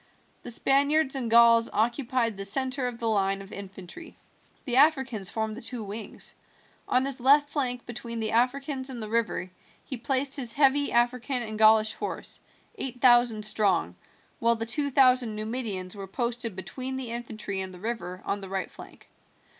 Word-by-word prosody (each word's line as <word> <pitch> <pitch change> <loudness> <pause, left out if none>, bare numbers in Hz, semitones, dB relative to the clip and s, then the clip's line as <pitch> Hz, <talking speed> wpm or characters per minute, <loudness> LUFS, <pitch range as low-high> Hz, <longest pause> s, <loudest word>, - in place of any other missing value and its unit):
The - - -7
Spaniards 280 +4 +2
and 250 -4 -2
Gauls 230 0 +5
occupied 235 0 0
the 195 - -6
centre 255 +5 -1
of 245 -1 -5
the 230 - -3
line 195 -2 +1
of 195 +1 -11
infantry. 195 - -10 0.5
The 250 -3 0
Africans 265 - +3
formed 220 -1 -3
the 245 - -9
two 230 0 -3
wings. 210 +2 -5 0.5
On 255 +1 +2
his 275 -2 -2
left 290 +3 +5
flank 250 -5 -2
between 235 -1 -5
the 220 -1 -1
Africans 260 +3 0
and 255 -2 -6
the 215 - -5
river 210 -5 -1 0.3
he 260 - -4
placed 265 +3 +1
his 245 -5 0
heavy 285 +1 +3
African 245 +1 +1
and 215 -1 -6
Gaulish 220 0 +5
horse, - - -4 0.4
eight 255 -6 -2
thousand 240 -4 +4
strong, 195 - +1 0.4
while 235 0 +3
the 225 0 -4
two 285 +5 +1
thousand 255 -4 +4
Numidians 215 -4 -2
were 195 -1 -7
posted 235 0 -2
between 255 +8 -5
the 260 -3 -5
infantry 220 -4 -4
and 190 0 -4
the 180 - -12
river 205 -4 -5
on 200 - -2
the 195 - -8
right 190 -1 -4
flank. - - -14
235 Hz, 170 wpm, -27 LUFS, 215-260 Hz, 0.5 s, Gauls